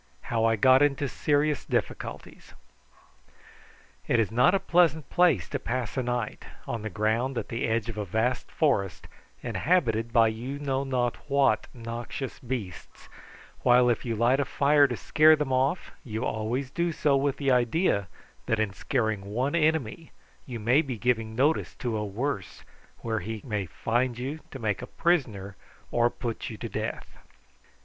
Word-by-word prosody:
HOW 115 -1 +2
I 115 0 +3
GOT 130 +5 +5
INTO 140 -1 +2
SERIOUS 145 +1 0
DIFFICULTIES. - - -4 1.5
It 120 - +3
is 110 -2 +1
not 125 +11 +4
a - - +2
pleasant 165 -5 +2
place 165 - +3
to - - -2
pass 125 -2 -3
a 130 - 0
night, 120 -3 -3 0.2
on 115 -2 -4
the 110 - -4
ground 110 +6 0
at - - -4
the 115 0 -2
edge 115 -1 0
of 110 -2 -5
a - - -1
vast 110 +6 -1
forest, 105 - 0 0.4
inhabited 115 -10 +1
by 115 -2 +5
you 120 +6 -5
know 135 -2 -1
not 125 -3 -1
what 140 -1 +2
noxious 120 +3 -6
beasts, 115 -9 -7 0.5
while 125 0 +5
if 115 - -2
you 115 -2 -2
light 120 +5 +3
a 140 - +1
fire 145 +1 +4
to 120 -3 -4
scare 155 0 +5
them 150 -4 -2
off 135 +7 0
you 115 -3 -4
always 120 +5 -2
do 170 +2 0
so 150 -3 +2
with 135 0 +1
the 140 -2 +1
idea 125 - +2 0.4
that 115 - +1
in 105 -3 0
scaring 110 -2 -1
one 125 +7 -1
enemy 160 -3 0 0.4
you 120 -3 -5
may 120 +7 +4
be 135 -6 -5
giving 115 -1 0
notice 145 +6 +1
to 120 -4 -3
a 105 - -1
worse 105 +1 -4 0.4
where 110 -1 -1
he 110 +2 -6
may 105 -6 -2
find 120 +7 -1
you 135 +5 -4
to - - -8
make 110 -5 -2
a - - -7
prisoner 110 - 0 0.4
or 120 0 +3
put 120 -2 -5
you - - -7
to - - -5
death. - - -5
125 Hz, 170 wpm, -27 LUFS, 110-140 Hz, 1.5 s, GOT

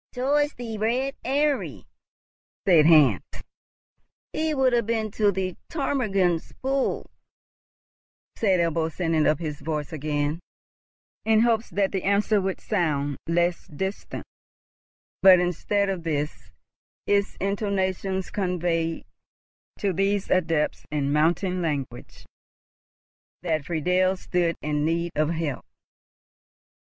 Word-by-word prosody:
"Towards 290 +4 +1
the 225 -3 -6
Red 250 +5 0
Eyrie," 285 +2 0 0.8
said 165 -6 +6
Hans. 145 - +6 1.1
"He 315 0 0
will 265 -2 +3
have 235 -3 +1
been 220 -2 -1
to 205 0 +2
the 185 -1 -3
Ptarmigan's 200 - 0
Pool," 270 0 0 1.3
said 195 -5 +2
Ebbo, 165 -1 0
sending 165 -2 +1
up 155 - +3
his 150 -3 -5
voice 150 +1 -4
again, 150 +1 -1 0.8
in 220 0 +4
hopes 230 -1 +2
that 195 -1 0
the 190 - -1
answer 200 +2 +2
would 190 0 -2
sound 145 - -1
less 170 +1 0
distant; 190 +6 -5 1.0
but, 190 -1 +8
instead 180 +3 0
of 190 -3 -2
this, 150 -2 -3 0.6
its 200 0 +1
intonations 190 -1 -1
conveyed, 175 -4 -1 0.7
to 200 -2 0
these 195 +2 0
adepts 165 -4 +1
in 145 -1 -1
mountain 175 +4 +1
language, 140 -7 -4 1.2
that 160 -4 -1
Friedel 180 +4 +1
stood 175 -2 0
in 150 0 0
need 170 +2 0
of 155 0 +1
help. 160 -5 -2
180 Hz, 110 wpm, -25 LUFS, 160-205 Hz, 1.3 s, but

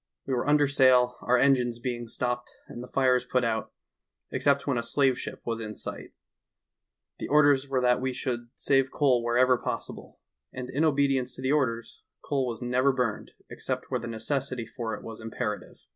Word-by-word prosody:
We 135 - -2
were 125 - -1
under 145 -1 +4
sail, 130 -3 +4
our 125 +1 +3
engines 125 -3 +3
being 120 -1 -4
stopped 120 +1 -3
and 120 - -8
the 125 - -8
fires 130 -2 +2
put 125 0 0
out, 110 -2 -1 0.6
except 140 -1 +1
when 130 -4 0
a - - 0
slave 130 +2 +1
ship - - -7
was 115 -1 -2
in 105 -1 -6
sight; - - -7 1.1
the - - -4
orders 145 -2 +4
were 130 -2 +1
that 125 0 +3
we 130 0 -1
should 120 -2 -4
save 135 -1 +2
coal 130 -5 +2
wherever 125 +1 +3
possible, - - -6 0.3
and 125 0 -6
in 145 +4 0
obedience 135 -4 +1
to 130 - -9
the 130 - +1
orders, 115 -6 -1 0.2
coal 135 -3 0
was 120 0 -5
never 125 +3 +2
burned 125 -5 -2 0.2
except - - -5
where - - 0
the 120 - -6
necessity 120 +2 -3
for 115 -1 -5
it - - -11
was 115 0 -8
imperative. 110 -1 -4
125 Hz, 185 wpm, -27 LUFS, 120-135 Hz, 1.1 s, under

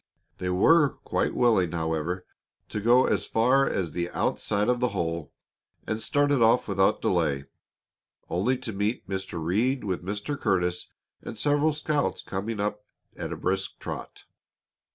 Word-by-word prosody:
They 90 - -2
were 145 - +5
quite - - -1
willing, 100 -9 +3
however, 80 +2 -2 0.4
to 105 - -3
go 120 +4 +5
as - - 0
far 130 +5 +3
as 90 -4 -2
the 85 0 -2
outside 100 +3 0
of 125 0 +2
the 125 - +2
hole, 85 -2 -2 0.5
and 110 0 -2
started 145 +2 +2
off 115 +2 +4
without 95 -1 +2
delay, 70 0 +1 0.8
only 110 +9 +1
to 125 -3 -5
meet 105 +4 -2
Mr. 95 -3 -4
Reed 110 +11 0
with 95 -4 -2
Mr. 105 +9 -3
Curtis 90 -4 0 0.3
and - - -8
several 145 +5 +2
scouts 150 -1 -1
coming 105 +3 -4
up 105 0 -2 0.3
at - - -5
a - - -4
brisk 95 +1 -2
trot. - - -7
105 Hz, 150 wpm, -27 LUFS, 90-125 Hz, 0.8 s, were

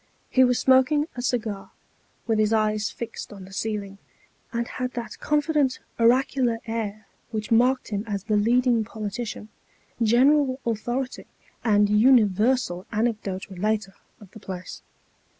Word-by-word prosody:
He 260 - +5
was 250 -1 +3
smoking 265 +3 +4
a 245 - -4
cigar, 220 -5 -2 0.6
with 225 -2 +1
his 215 0 +2
eyes 215 -1 +1
fixed 235 - -7
on 195 -2 -10
the 190 - -14
ceiling, 200 -2 -4 0.5
and 235 0 -2
had 255 0 -4
that 235 -1 -6
confident 295 -3 +1 0.2
oracular 245 0 +3
air 215 -2 -4 0.2
which 215 -2 -5
marked 250 +3 +3
him 205 -1 -2
as 200 -3 -3
the 215 0 0
leading 235 +2 +3
politician, 215 0 -6 0.5
general 260 +4 +4
authority, 240 +3 -3 0.4
and 210 -2 +4
universal 210 -3 +3
anecdote 215 -4 -2
relater, 205 +1 -2 0.3
of 205 -4 -15
the 220 - -12
place. 185 -3 -8
225 Hz, 135 wpm, -25 LUFS, 210-250 Hz, 0.6 s, He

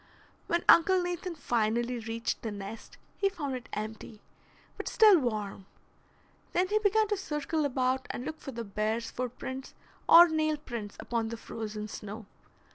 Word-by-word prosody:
When 340 0 0
Uncle 370 +3 +7
Nathan 355 0 -3
finally 240 -2 0
reached 230 +1 -3
the 225 - -3
nest, 205 +2 -8 0.2
he 395 - +2
found 295 -8 -4
it 250 -2 -8
empty, 215 0 -6 0.6
but - - -6
still 425 -5 +7
warm. 210 -6 -3 0.9
Then 365 +1 +2
he 425 +1 +3
began 430 +1 +3
to 415 - +1
circle 305 -3 -2
about 260 -1 0
and 245 - -4
look 315 +1 -5
for 270 - -7
the 235 -2 -5
bear's 215 +2 -2
footprints 255 +2 -5 0.3
or 345 +1 +10
nail 310 -1 +1
prints 235 -8 -7
upon 230 -2 -2
the 230 +1 -5
frozen 215 -2 -6
snow. 210 0 -7
255 Hz, 155 wpm, -30 LUFS, 225-325 Hz, 0.9 s, or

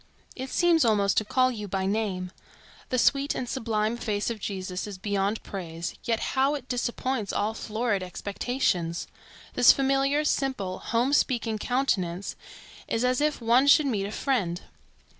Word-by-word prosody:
It 260 0 -5
seems 340 0 +3
almost 205 -4 +3
to - - +4
call 255 +4 +2
you 210 -4 -6
by 190 0 -2
name. 195 -3 -1 0.6
The 255 - 0
sweet 280 +3 +2
and 250 - -3
sublime 225 -2 -1
face 210 -1 -1
of 225 - -5
Jesus 190 -1 -4
is 200 -2 -7
beyond 200 +2 -1
praise, 170 -3 -5
yet 230 -1 +1
how 270 +2 +2
it 265 -3 -7
disappoints 245 -2 -2
all 210 +2 0
florid 220 -2 -1
expectations! 185 -2 -2 0.5
This 245 - +7
familiar, 275 +2 +2
simple, 260 -11 -1
home 245 +4 0
speaking 230 -6 +1
countenance 200 -8 -1 0.5
is 230 +2 0
as 255 +2 +1
if 300 -3 0
one 240 +4 +4
should 295 +1 +6
meet 210 -8 0
a - - -6
friend. 205 -10 -1
225 Hz, 155 wpm, -27 LUFS, 200-260 Hz, 0.6 s, This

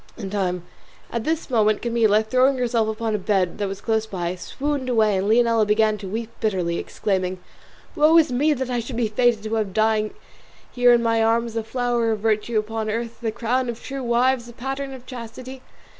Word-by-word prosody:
At 235 -1 -3
this 320 -3 -2
moment 215 -3 +2
Camilla, 225 -3 +3
throwing 255 +4 +3
herself 235 -3 +1
upon 220 0 -2
a 210 - 0
bed 190 -3 0
that 205 - 0
was 195 0 -6
close 220 -1 0
by, 175 -4 -3
swooned 275 +7 -3
away, 220 -4 +3
and 195 +2 -1
Leonela 230 -1 +4
began 215 +1 +2
to 195 - -7
weep 225 +4 -4
bitterly, 185 -6 0
exclaiming, 185 -2 -2 0.6
"Woe 310 +2 +5
is 315 -5 +4
me! 290 +5 +2
that 260 -2 -3
I 245 - 0
should 235 +2 -6
be 235 -2 +1
fated 225 0 +2
to 220 0 -4
have 215 -4 -1
dying 215 -1 +1 0.6
here 245 -1 +4
in 240 -1 +4
my 225 -1 +2
arms 230 +1 +1
the 225 -1 -2
flower 240 0 0
of 210 - -5
virtue 220 +1 0
upon 215 0 -2
earth, 230 +2 -4
the 225 -2 -1
crown 245 +3 -1
of 235 0 -5
true 275 0 -5
wives, 245 0 +1
the 240 - -11
pattern 270 +3 -4
of 255 -1 -13
chastity!" 255 +2 -8
230 Hz, 195 wpm, -23 LUFS, 215-245 Hz, 0.6 s, Woe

